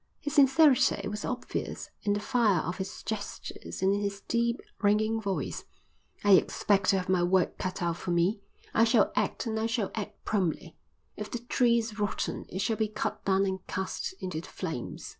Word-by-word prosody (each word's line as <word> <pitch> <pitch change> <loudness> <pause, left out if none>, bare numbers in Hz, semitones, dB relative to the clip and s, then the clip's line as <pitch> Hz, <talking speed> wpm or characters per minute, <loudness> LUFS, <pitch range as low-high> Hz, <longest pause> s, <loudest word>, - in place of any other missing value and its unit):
His 290 -3 -4
sincerity 270 -7 +5
was 210 +1 -4
obvious 250 -1 -4
in 205 - +1
the 205 - 0
fire 215 -6 +2
of 175 - -4
his 190 0 -5
gestures 205 -3 -5
and 190 +1 +4
in 205 - 0
his 200 -1 -3
deep, 235 +2 0 0.2
ringing 215 +2 +2
voice. 200 -3 -3 0.6
"I 205 - +4
expect 195 +1 +4
to 195 - +5
have 185 - -3
my 185 -1 +3
work 180 +1 +2
cut 185 0 -3
out 170 -1 0
for 185 - -6
me. 175 +5 +2 0.3
I 225 - +5
shall 230 -1 +4
act - - 0
and 220 -1 -1
I 220 - +1
shall 225 -3 -1
act 215 -2 -6
promptly. 175 -5 -1 0.4
If 210 0 -6
the - - -3
tree 240 0 +2
is 225 -2 -3
rotten 205 0 -2
it 190 - -3
shall 225 0 0
be 220 - +1
cut 210 0 -3
down 195 0 +3
and 190 -1 -1
cast 190 - -3
into 175 -4 -4
the - - -12
flames." 160 -10 -5
205 Hz, 195 wpm, -29 LUFS, 190-225 Hz, 0.6 s, sincerity